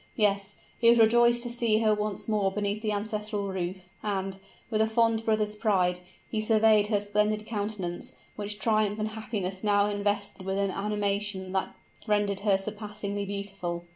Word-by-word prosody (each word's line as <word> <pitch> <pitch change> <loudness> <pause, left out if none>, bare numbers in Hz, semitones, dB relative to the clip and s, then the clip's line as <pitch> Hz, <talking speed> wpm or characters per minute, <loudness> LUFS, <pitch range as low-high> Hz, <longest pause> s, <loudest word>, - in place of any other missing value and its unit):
Yes, 200 -2 +1 0.2
he 230 - +6
was 235 - +6
rejoiced 235 +1 +5
to 240 - -4
see 235 -3 +2
her 215 -1 +4
once 210 -1 -3
more 205 -3 +1
beneath 205 +1 -2
the 215 -1 -1
ancestral 210 -1 -2
roof; 180 0 -4
and, 195 -2 -2 0.3
with 215 -1 +2
a 220 - +4
fond 225 0 +2
brother's 215 -1 +1
pride, 185 -5 +1 0.3
he 215 - -2
surveyed 215 -1 +4
her 210 -1 +2
splendid 210 +1 0
countenance, 205 -5 -4 0.2
which 205 0 -4
triumph 215 0 +1
and 215 0 -1
happiness 210 -4 -4
now 205 -1 +4
invested 205 -1 -2
with 190 +1 -2
an 200 -1 +1
animation 200 -1 -1
that 190 0 -2 0.3
rendered 205 -2 +1
her 200 -1 +3
surpassingly 205 0 -5
beautiful! 195 -4 -4
210 Hz, 165 wpm, -28 LUFS, 195-215 Hz, 0.3 s, he